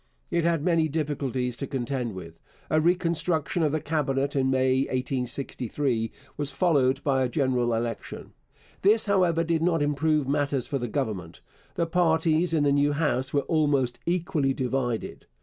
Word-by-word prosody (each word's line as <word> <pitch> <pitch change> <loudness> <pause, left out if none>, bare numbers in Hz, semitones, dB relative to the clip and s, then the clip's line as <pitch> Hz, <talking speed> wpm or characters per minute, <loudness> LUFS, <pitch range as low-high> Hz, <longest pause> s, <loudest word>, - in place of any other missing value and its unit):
It 170 -1 +1
had 165 -3 +1
many 165 -2 +2
difficulties 135 -5 -2
to 140 - -4
contend 125 -4 -3
with. 85 -3 -10 0.3
A 155 - +3
reconstruction 170 -1 0
of 155 -2 +2
the 155 - 0
Cabinet 140 -3 -1
in 130 -1 +2
May 130 0 +2
1863 125 -1 -2 0.3
was 145 -1 -1
followed 140 -3 +2
by 135 -2 +2
a 130 - +1
general 125 -3 +1
election. 115 -1 -5 0.5
This, 215 +3 +4
however, 180 -5 +2
did 165 -1 0
not 165 -3 +2
improve 150 0 +1
matters 140 -2 0
for 140 -2 -2
the 120 - -3
Government. 105 - -4 0.3
The 170 - +1
parties 165 -1 +2
in 160 -3 +2
the 145 - +3
new 145 +1 +3
House 140 -4 0
were 145 - +2
almost 140 -6 +1
equally 165 -6 0
divided. 125 -3 -2
145 Hz, 155 wpm, -26 LUFS, 130-160 Hz, 0.5 s, This